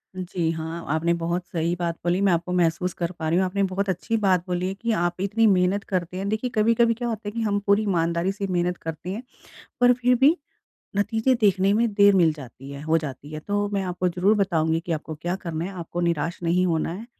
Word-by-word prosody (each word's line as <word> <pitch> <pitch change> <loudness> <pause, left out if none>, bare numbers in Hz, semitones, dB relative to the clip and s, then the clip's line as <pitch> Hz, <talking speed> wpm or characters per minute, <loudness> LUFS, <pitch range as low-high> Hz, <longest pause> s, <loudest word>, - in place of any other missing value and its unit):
जी 180 -2 -2
हाँ 160 +1 -5
आपने 170 +2 +1
बहुत 170 +1 -2
सही 170 +1 0
बात 170 -1 -1
बोली 175 +1 +1
मैं 195 -2 +4
आपको 170 +1 -1
महसूस 180 +1 +1
कर 170 0 -3
पा 160 -3 -5
रही 170 - +2
हूँ। 190 - +3
आपने 200 +2 0
बहुत 200 0 -1
अच्छी 190 +5 -1
बात 185 -4 +2
बोली 180 0 -1
है 190 - -2
कि 230 +4 -3
आप 175 +1 -2
इतनी 220 +3 +2
मेहनत 190 0 +2
करते 180 -1 -2
हैं। 195 - -3
देखिए 220 +4 -1
कभी-कभी 230 +2 +3
क्या 240 +1 -4
होता 220 -2 -4
है 205 - -2
कि 230 - -3
हम 205 -2 +1
पूरी 200 +2 +4
ईमानदारी 170 -1 0
से 200 0 -4
मेहनत 175 0 0
करते 165 +2 -6
हैं 220 +6 -4 0.6
पर 245 0 +7
फिर 250 0 +2
भी 295 +5 +6 0.6
नतीज़े 220 +5 +2
देखने 195 -1 +3
में 230 +2 +3
देर 200 -1 +6
मिल 170 -4 +4
जाती 135 -1 -11
है 140 - -7
हो 160 +1 +2
जाती 145 -1 -7
है। 155 - -5
तो 205 +3 -1
मैं 195 -1 0
आपको 180 0 -1
ज़रूर 180 +5 +2
बताऊँगी 165 -5 +1
कि 170 0 -4
आपको 155 0 -4
क्या 175 +4 -3
करना 165 -3 -4
है 190 - -4
आपको 170 +1 -4
निराश 170 0 -1
नहीं 175 +2 +2
होना 165 -2 0
है। 215 +7 -7
180 Hz, 235 wpm, -24 LUFS, 170-205 Hz, 0.6 s, पर